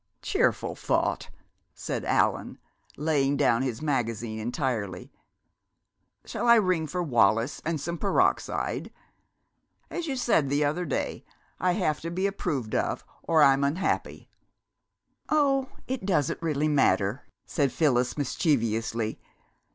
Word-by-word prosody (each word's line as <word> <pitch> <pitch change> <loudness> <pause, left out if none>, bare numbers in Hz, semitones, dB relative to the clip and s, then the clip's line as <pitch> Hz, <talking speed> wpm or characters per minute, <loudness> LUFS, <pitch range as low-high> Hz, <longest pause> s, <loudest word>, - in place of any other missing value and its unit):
"Cheerful - - +1
thought!" - - -1 0.5
said - - -4
Allan, - - +1 0.4
laying 145 -2 +1
down 130 -4 +3
his 130 0 -3
magazine 115 -6 -1
entirely. 110 - -3 1.1
"Shall 240 - -3
I 235 - +8
ring 185 -7 +2
for 175 +4 -2
Wallis 115 - +2
and 160 -1 -1
some 170 +3 -4
peroxide? 200 - 0 1.0
As 345 -1 -3
you 275 - -1
said 230 - +2
the 145 +1 +2
other 165 +5 -1
day, 140 - -3 0.4
'I 180 -1 +2
have 175 -6 0
to 165 - -4
be 185 +3 -1
approved 155 - -2
of - - -1 0.2
or 160 -2 +4
I'm 135 0 +5
unhappy!'" 150 +7 -1 1.0
"Oh, 275 -3 +2 0.2
it 260 0 -3
really - - -7
doesn't 155 -3 0
matter," 125 -3 +2 0.2
said 140 -3 0
Phyllis 125 -5 +1
mischievously. 115 -6 0
145 Hz, 120 wpm, -27 LUFS, 125-175 Hz, 1.1 s, I